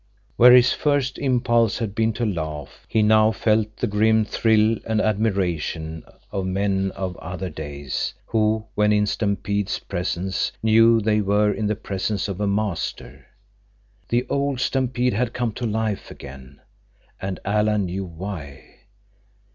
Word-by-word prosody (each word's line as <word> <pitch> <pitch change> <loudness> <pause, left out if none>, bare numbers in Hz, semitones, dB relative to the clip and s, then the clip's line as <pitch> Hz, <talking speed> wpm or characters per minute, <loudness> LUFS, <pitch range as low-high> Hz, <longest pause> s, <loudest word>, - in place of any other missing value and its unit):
Where 125 +1 +8
his 125 -1 +6
first 145 -3 0
impulse 120 -4 +2
had 110 -4 -3
been 110 +1 +1
to 120 +2 -2
laugh, 80 - -5
he 110 - +2
now 110 0 +5
felt 110 -1 0
the - - -1
grim 110 +1 +2
thrill 110 +1 +2
and 110 -1 +1
admiration 90 -7 -1 0.3
of 95 -1 -2
men 95 0 0
of 95 -2 -4
other 90 0 -6
days, 70 -3 -4
who, 110 -1 +1
when 105 0 +2
in 105 0 +3
Stampede's 100 -1 -1
presence, 95 0 -2
knew 115 +1 +5
they 105 0 +2
were 105 +1 +2
in 110 - -2
the 105 - 0
presence 100 0 -3
of 100 0 -5
a 105 - +1
master. 100 -1 -3 0.8
The 120 +1 +1
old 140 -2 -1
Stampede 125 -2 0
had 120 +3 -1
come 120 -2 -1
to 120 +3 -4
life 110 -1 -2
again. 65 0 -12 0.6
And 95 -1 -4
Alan 105 0 +1
knew 95 +2 -4
why. 80 -5 -8
105 Hz, 145 wpm, -23 LUFS, 95-110 Hz, 0.8 s, Where